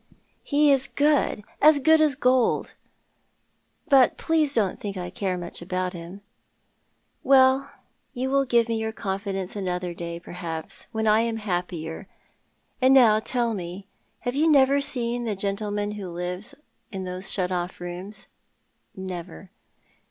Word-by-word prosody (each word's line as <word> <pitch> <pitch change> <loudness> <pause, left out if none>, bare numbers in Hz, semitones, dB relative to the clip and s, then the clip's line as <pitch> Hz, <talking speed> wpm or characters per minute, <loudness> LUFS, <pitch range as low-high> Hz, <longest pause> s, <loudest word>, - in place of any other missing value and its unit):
" - - -41
He 290 0 +3
is 270 -1 +2
good— 290 -7 +1 0.2
as 305 0 +7
good 315 +3 +4
as 300 -3 +3
gold; 255 -3 +1 1.1
but 265 -4 +5
please 310 -3 +1
don't 205 -5 0
think 200 -2 -5
I 180 -1 -5
care 185 -1 -2
mncli 175 -1 -7
about 185 +1 -3
him." 175 +3 -9 0.5
" - - -44
Well, 265 +1 +5 0.4
you 260 +2 -3
will 275 0 +3
give 235 -2 +2
me 230 -1 -1
your 220 0 -3
confidence 195 -2 -4
another 180 -3 -3
day, 170 0 -6
per - - -13
haps, 165 -3 -5
when 220 -1 -2
I 215 0 +4
am 230 -1 -1
happier; 175 -5 -4 0.7
and 260 +1 +5
now 225 -5 +6
tell 235 0 -1
me, 185 0 -6 0.4
have 245 - -2
you 310 +4 +2
never 280 -1 +4
seen 240 -3 +1
the 215 -3 -2
gentleman 205 +1 -2
who 205 -3 -6
lives 180 +8 -5 0.4
in 190 -2 -5
those 185 +1 -4
shut 185 -2 -1
off 180 0 -3
rooms? 175 +4 -7 0.2
" - - -45
" - - -44
Never." 185 0 -8
205 Hz, 160 wpm, -25 LUFS, 180-255 Hz, 1.1 s, as